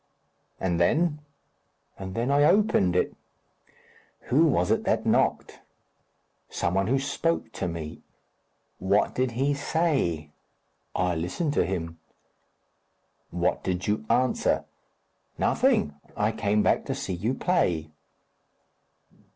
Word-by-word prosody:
"And 85 -2 0
then?" 150 - +2 0.8
"And 95 -1 -7
then 120 +4 0
I 145 +1 +4
opened 190 - +3
it." 90 - +1 1.2
"Who 150 +6 +5
was 90 - +1
it - - +2
that - - +1
knocked?" - - +1 0.9
"Some 85 - -1
one 95 +1 +1
who 135 +4 +2
spoke 140 0 -1
to 95 - -3
me." 80 -2 -6 0.8
"What 100 +3 +2
did 130 -2 -1
he 140 +2 +2
say?" 140 - 0 0.6
"I 90 -1 +1
listened 90 - -2
to - - +2
him." 85 -3 -4 1.3
"What 85 0 -1
did 90 0 -2
you 105 +1 0
answer?" 125 +2 +1 0.7
"Nothing. 75 - +2 0.2
I 105 +1 +2
came 105 -1 +1
back - - +2
to - - -2
see - - -4
you 105 +9 -1
play." 85 - 0
105 Hz, 120 wpm, -26 LUFS, 90-140 Hz, 1.3 s, Who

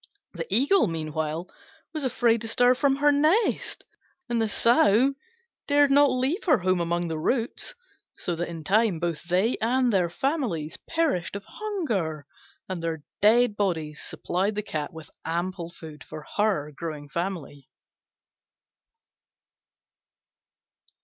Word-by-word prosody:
The - - -5
Eagle, 285 - +5
meanwhile 155 0 -3 0.5
was 310 -2 -3
afraid 235 -3 +2
to 225 - -4
stir 245 +2 +4
from 270 +1 +2
her 290 +1 +4
nest, 310 +10 +1 0.4
and 240 -2 0
the 220 - +1
Sow 235 +3 +4 0.5
dared 285 -1 +4
not 285 +1 +6
leave 265 - 0
her 310 -7 +5
home 185 -1 +1
among 170 +1 -1
the 160 -1 -3
roots: 245 - -1 0.4
so 175 - -3
that 175 +1 -3
in 165 -2 -7
time 205 0 +2
both 170 -2 -2
they 185 +7 +1
and 245 +1 +2
their 180 -3 +2
families 190 - -2
perished 320 - 0
of 200 0 -6
hunger, 220 - -3 0.4
and 185 -2 -4
their 165 -2 -3 0.2
dead 225 +2 +5
bodies 160 -7 -2
supplied 195 +4 -2
the 210 - -2
Cat 155 -6 -4
with 160 -2 -11
ample 170 +1 -3
food 160 -3 -11
for 155 -1 -9
her 200 -9 +1
growing 155 -3 -6
family. 165 -4 -5
195 Hz, 135 wpm, -26 LUFS, 165-255 Hz, 0.5 s, not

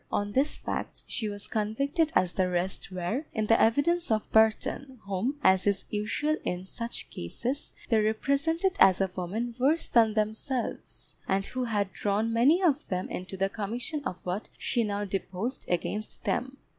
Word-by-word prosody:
On 205 0 0
these 270 +7 +1
facts - - -4
she 220 -4 -2
was 205 -1 -5
convicted 275 +9 0
as 185 -1 +3
the 185 -1 +1
rest 180 +2 -2
were, 185 - -2
in 220 -2 0
the 225 +2 +4
evidence 335 +10 +3
of 215 -1 +1
Burton, 220 +4 +2
whom, 200 +8 -1
as 190 +1 +4
is 200 -1 +1
usual 225 +9 0
in 180 +1 -3
such 230 +4 -5
cases, 245 - -3 0.2
they 225 -3 +4
represented 280 - +1
as 190 -1 +7
a 190 -2 +1
woman 215 +7 -3
worse 295 +6 +2
than 225 -2 +4
themselves, 220 +4 -3
and 195 +1 +1
who 255 +3 -3
had 205 -4 -1
drawn 215 +3 0
many 285 +11 +4
of 305 -4 +2
them 185 -2 -2
into 190 +1 -5
the 195 +1 +2
commission 235 +9 -3
of 185 -9 -5
what 185 +4 -3
she 235 - 0
now 205 -1 -1
deposed 195 +5 -3
against 205 +5 -2
them. 260 +2 -1
220 Hz, 170 wpm, -29 LUFS, 195-260 Hz, 0.2 s, as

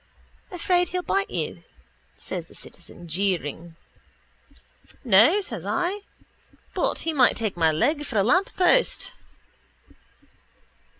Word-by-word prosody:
—Afraid 360 -1 +1
he'll 360 +1 -3
bite 395 +2 0
you? - - -4 0.6
says - - -6
the - - -18
citizen, 175 - -12
jeering. 170 -2 -2 1.3
—No, 245 - +5
says - - -6
I. 360 +3 -1 0.7
But - - 0
he 325 - 0
might 260 -4 +4
take 220 -4 -2
my 165 -2 +3
leg 280 - +1
for 265 -6 -4
a 200 - +4
lamppost. 370 - +2
290 Hz, 110 wpm, -24 LUFS, -, 1.3 s, No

